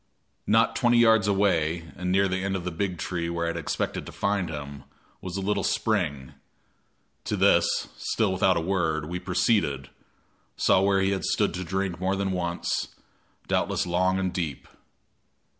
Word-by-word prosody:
Not 110 Hz, +2 st, +3 dB
twenty 120 Hz, -1 st, +3 dB
yards 110 Hz, -3 st, +5 dB
away, 85 Hz, -5 st, +1 dB
and 90 Hz, 0 st, -3 dB
near 100 Hz, +1 st, +3 dB
the 95 Hz, 0 st, -2 dB
end 95 Hz, 0 st, -1 dB
of 90 Hz, -, -3 dB
the 90 Hz, -, -3 dB
big 90 Hz, +1 st, -2 dB
tree 85 Hz, 0 st, -3 dB
where 85 Hz, 0 st, -2 dB
I -, -, 0 dB
had 85 Hz, -, -3 dB
expected 80 Hz, -, -3 dB
to -, -, -7 dB
find 100 Hz, -3 st, -1 dB
him, 70 Hz, -1 st, -7 dB, 0.4 s
was 90 Hz, 0 st, -5 dB
a -, -, -2 dB
little 105 Hz, +2 st, 0 dB
spring. 70 Hz, -3 st, -1 dB, 0.9 s
To -, -, -2 dB
this, -, -, +3 dB
still 105 Hz, -4 st, 0 dB
without 95 Hz, 0 st, +3 dB
a -, -, 0 dB
word, 80 Hz, -4 st, 0 dB
we 90 Hz, +3 st, -4 dB
proceeded, 90 Hz, -, 0 dB, 0.7 s
saw 95 Hz, -, +4 dB
where 100 Hz, 0 st, +3 dB
he 95 Hz, 0 st, +2 dB
had 95 Hz, -, -2 dB
stood -, -, +1 dB
to 90 Hz, +2 st, -4 dB
drink 95 Hz, 0 st, -2 dB
more 95 Hz, +1 st, 0 dB
than 95 Hz, 0 st, -1 dB
once, 85 Hz, -1 st, -2 dB, 0.5 s
doubtless -, -, 0 dB
long 90 Hz, +2 st, +1 dB
and 95 Hz, -2 st, -1 dB
deep. 80 Hz, -7 st, -4 dB
95 Hz, 175 wpm, -26 LUFS, 85-100 Hz, 0.9 s, yards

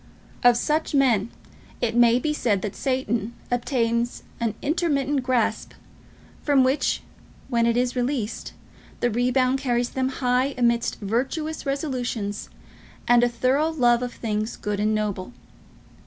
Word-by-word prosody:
Of 245 Hz, -1 st, +6 dB
such 300 Hz, +4 st, 0 dB
men 235 Hz, -6 st, +3 dB, 0.5 s
it 230 Hz, -1 st, -1 dB
may 240 Hz, 0 st, +5 dB
be 300 Hz, +4 st, -1 dB
said 210 Hz, -9 st, 0 dB
that 205 Hz, -, -4 dB
Satan 240 Hz, -4 st, -1 dB, 0.2 s
obtains 235 Hz, -1 st, 0 dB, 0.2 s
an 230 Hz, -3 st, -1 dB
intermittent 290 Hz, -3 st, 0 dB
grasp, 250 Hz, -3 st, 0 dB, 0.7 s
from 280 Hz, -3 st, +4 dB
which, 260 Hz, +3 st, +1 dB, 0.5 s
when 235 Hz, -2 st, +2 dB
it 235 Hz, 0 st, +2 dB
is 250 Hz, 0 st, 0 dB
released, 245 Hz, -3 st, -2 dB, 0.5 s
the 240 Hz, -, +1 dB
rebound 255 Hz, +3 st, +2 dB
carries 245 Hz, -2 st, 0 dB
them 260 Hz, 0 st, 0 dB
high 255 Hz, +1 st, 0 dB
amidst 235 Hz, -1 st, +1 dB
virtuous 270 Hz, +9 st, -2 dB
resolutions 250 Hz, -7 st, -3 dB, 0.6 s
and 240 Hz, 0 st, +5 dB
a 245 Hz, -, +4 dB
thorough 255 Hz, +6 st, +1 dB
love 240 Hz, -6 st, +3 dB
of 245 Hz, -1 st, -4 dB
things 215 Hz, -1 st, -3 dB
good 205 Hz, -1 st, -3 dB
and 215 Hz, +1 st, +1 dB
noble. 210 Hz, 0 st, -3 dB
245 Hz, 135 wpm, -24 LUFS, 230-265 Hz, 0.7 s, Of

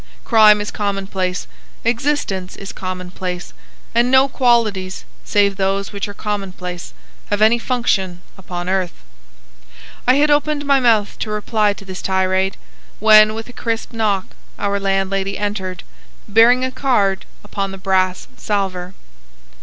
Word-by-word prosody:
Crime 215 Hz, -2 st, +6 dB
is 205 Hz, -, -4 dB
commonplace, 195 Hz, -3 st, -2 dB, 0.4 s
existence 230 Hz, -7 st, -1 dB
is 195 Hz, -, -8 dB
commonplace, 180 Hz, -1 st, -5 dB, 0.4 s
and 240 Hz, +1 st, +3 dB
no 265 Hz, +1 st, +5 dB
qualities 225 Hz, -8 st, +1 dB, 0.2 s
save 200 Hz, -1 st, +2 dB
those 195 Hz, 0 st, -1 dB
which 200 Hz, 0 st, -3 dB
are 205 Hz, -, -9 dB
commonplace 185 Hz, -, -5 dB, 0.3 s
have 205 Hz, -, -1 dB
any 220 Hz, +2 st, +4 dB
function 200 Hz, -8 st, -1 dB, 0.2 s
upon 175 Hz, -2 st, -6 dB
earth." 185 Hz, -, -2 dB, 1.0 s
I 255 Hz, -, +6 dB
had 295 Hz, +1 st, +3 dB
opened 290 Hz, 0 st, +1 dB
my 280 Hz, -1 st, +4 dB
mouth 225 Hz, -5 st, +2 dB
to 215 Hz, -, -3 dB
reply 210 Hz, 0 st, +1 dB
to 200 Hz, -, -13 dB
this 190 Hz, -1 st, -7 dB
tirade, 190 Hz, 0 st, 0 dB, 0.4 s
when 215 Hz, 0 st, +7 dB
with 225 Hz, 0 st, -6 dB
a 245 Hz, -, -12 dB
crisp 230 Hz, 0 st, -3 dB
knock 210 Hz, -4 st, 0 dB, 0.3 s
our 200 Hz, 0 st, -1 dB
landlady 195 Hz, 0 st, -1 dB
entered, 195 Hz, -3 st, -3 dB, 0.4 s
bearing 235 Hz, +4 st, +5 dB
a 260 Hz, -, -3 dB
card 225 Hz, -8 st, +1 dB, 0.2 s
upon 200 Hz, -1 st, -3 dB
the 195 Hz, -, -8 dB
brass 185 Hz, -1 st, 0 dB
salver. 185 Hz, +2 st, -3 dB
200 Hz, 135 wpm, -19 LUFS, 190-225 Hz, 1.0 s, when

